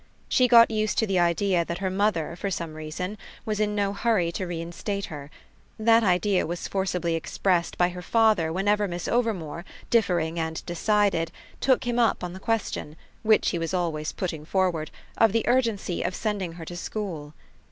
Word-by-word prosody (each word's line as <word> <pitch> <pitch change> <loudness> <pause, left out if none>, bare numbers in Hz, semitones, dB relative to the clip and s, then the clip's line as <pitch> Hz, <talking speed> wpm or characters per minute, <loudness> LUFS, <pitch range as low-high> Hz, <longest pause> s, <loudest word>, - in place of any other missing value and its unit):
She 255 - +4
got 235 -1 +7
used 215 -1 0
to 220 - +3
the 195 -3 +1
idea 175 +1 +2
that 170 +1 -4
her 190 0 -2
mother, 190 -5 0
for 200 +3 -3
some 170 -4 -4
reason, 155 +6 -5 0.3
was 215 -1 -2
in 210 -1 +1
no 200 -1 0
hurry 200 -5 +1
to 185 +2 -4
reinstate 175 +4 -4
her: 145 -1 -8 0.5
that 225 +1 +4
idea 185 -1 +2
was 175 +1 -4
forcibly 180 -3 -1
expressed 170 +1 0
by 175 0 +3
her 180 0 -7
father 215 -4 +3
whenever 205 +3 +1
Miss 175 -1 -4
Overmore, 190 -9 -1 0.3
differing 170 -7 +2
and 160 0 -3
decided, 175 -2 +1 0.3
took 260 -1 +3
him 240 -1 -1
up 230 -5 +2
on 175 -1 -4
the 190 - -8
question, 210 -8 -2 0.3
which 220 -1 +4
he 170 - -2
was 165 +3 -2
always 160 -4 -1
putting 165 -5 -4
forward, 170 -2 0 0.3
of 225 -3 +5
the 230 - 0
urgency 230 -8 +1
of 180 - -2
sending 200 -6 -2
her 165 -1 -9
to 175 - -7
school. 175 -6 -5
185 Hz, 180 wpm, -26 LUFS, 170-210 Hz, 0.5 s, got